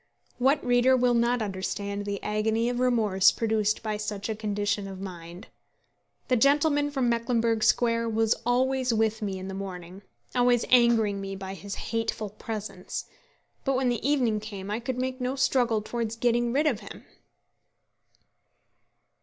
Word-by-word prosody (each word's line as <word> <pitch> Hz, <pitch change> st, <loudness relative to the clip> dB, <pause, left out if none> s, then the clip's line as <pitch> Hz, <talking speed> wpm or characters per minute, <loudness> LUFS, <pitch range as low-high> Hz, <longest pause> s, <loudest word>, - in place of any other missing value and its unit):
What 270 Hz, +3 st, +2 dB
reader 245 Hz, +1 st, +4 dB
will 250 Hz, -1 st, +3 dB
not 235 Hz, 0 st, +2 dB
understand 200 Hz, +1 st, -4 dB
the 200 Hz, -1 st, -4 dB
agony 220 Hz, +2 st, 0 dB
of 245 Hz, 0 st, -2 dB
remorse 220 Hz, -7 st, +4 dB
produced 215 Hz, -2 st, 0 dB
by 215 Hz, -1 st, -2 dB
such 210 Hz, 0 st, -4 dB
a 220 Hz, -, -1 dB
condition 205 Hz, -1 st, -2 dB
of 190 Hz, -1 st, -8 dB
mind? 175 Hz, -1 st, -9 dB, 0.8 s
The 255 Hz, -, +3 dB
gentleman 290 Hz, +3 st, +3 dB
from 270 Hz, -4 st, 0 dB
Mecklenburgh 230 Hz, -1 st, +1 dB
Square 230 Hz, 0 st, +2 dB
was 225 Hz, 0 st, +2 dB
always 255 Hz, +1 st, +1 dB
with 220 Hz, 0 st, +1 dB
me 195 Hz, -2 st, -3 dB
in 185 Hz, 0 st, -7 dB
the 190 Hz, -, -5 dB
morning, 185 Hz, -1 st, -7 dB, 0.3 s
always 245 Hz, -1 st, +3 dB
angering 230 Hz, -5 st, +4 dB
me 195 Hz, 0 st, -5 dB
by 190 Hz, 0 st, -6 dB
his 200 Hz, +1 st, -7 dB
hateful 225 Hz, -2 st, -3 dB
presence, 215 Hz, 0 st, -6 dB, 0.6 s
but 270 Hz, -1 st, +1 dB
when 255 Hz, -1 st, +1 dB
the 240 Hz, -2 st, -1 dB
evening 250 Hz, -6 st, +2 dB
came 205 Hz, -2 st, -7 dB
I 215 Hz, -, -1 dB
could 245 Hz, +1 st, -4 dB
make 255 Hz, 0 st, -3 dB
no 250 Hz, +2 st, -1 dB
struggle 250 Hz, -5 st, +1 dB
towards 230 Hz, 0 st, -3 dB
getting 240 Hz, 0 st, +1 dB
rid 285 Hz, +5 st, +1 dB
of 255 Hz, -9 st, +1 dB
him. -, -, -11 dB
225 Hz, 155 wpm, -27 LUFS, 205-245 Hz, 0.8 s, reader